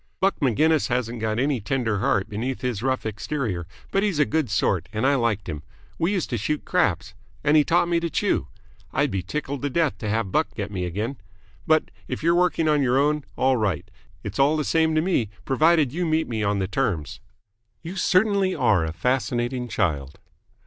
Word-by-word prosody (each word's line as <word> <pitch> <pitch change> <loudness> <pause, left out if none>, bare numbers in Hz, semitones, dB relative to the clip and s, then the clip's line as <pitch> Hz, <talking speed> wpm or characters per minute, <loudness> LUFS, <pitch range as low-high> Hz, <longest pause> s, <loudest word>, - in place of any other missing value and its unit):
Buck 195 -2 +1
Maginnis 150 +4 +3
hasn't 120 -2 -2
got 110 0 -1
any 135 -1 +1
tender 110 -2 -1
heart 95 -1 +1
beneath 120 +5 -3
his 125 -5 -2
rough 130 -1 -1
exterior, 110 - -3 0.2
but 195 - +2
he's 200 -6 0
a 150 - +4
good 155 -5 0
sort 100 - 0
and 110 +4 -1
I 140 - +4
liked 115 -7 0
him. 75 -2 -5 0.4
We 170 +4 +1
used 185 -8 -1
to 120 - -1
shoot 150 +8 -2
craps. - - 0 0.3
And 150 +1 +3
he 150 - +6
taught 170 +3 +2
me 170 -1 +2
to 170 0 -2
chew. - - 0 0.4
I'd - - +1
be 95 -1 -1
tickled 140 +7 -4
to 145 - -1
death 160 0 0
to 105 - -3
have 110 -2 -1
Buck 155 - 0
get 100 -1 -4
me 90 -3 -2
again. 105 +10 -3 0.5
But, 155 0 +3 0.2
if - - -5
you're 170 +1 +4
working 175 -2 +2
on 150 -1 +3
your 130 -1 +2
own, 150 +1 +1
all 130 0 +3
right. 100 -3 -1 0.3
It's - - -5
all 145 +3 +4
the 150 - 0
same 160 +1 +2
to 155 - +3
me, 160 - 0 0.2
provided 155 -1 +3
you 175 +3 -1
meet 160 0 +1
me 110 -3 -3
on 100 -1 +1
the 95 -1 -1
terms." 85 -6 -2 0.6
"You 170 +3 -6
certainly 190 0 +2
are 90 -6 +3
a 80 0 -3
fascinating 125 +5 -1
child." 80 - -1
130 Hz, 205 wpm, -24 LUFS, 105-155 Hz, 0.6 s, he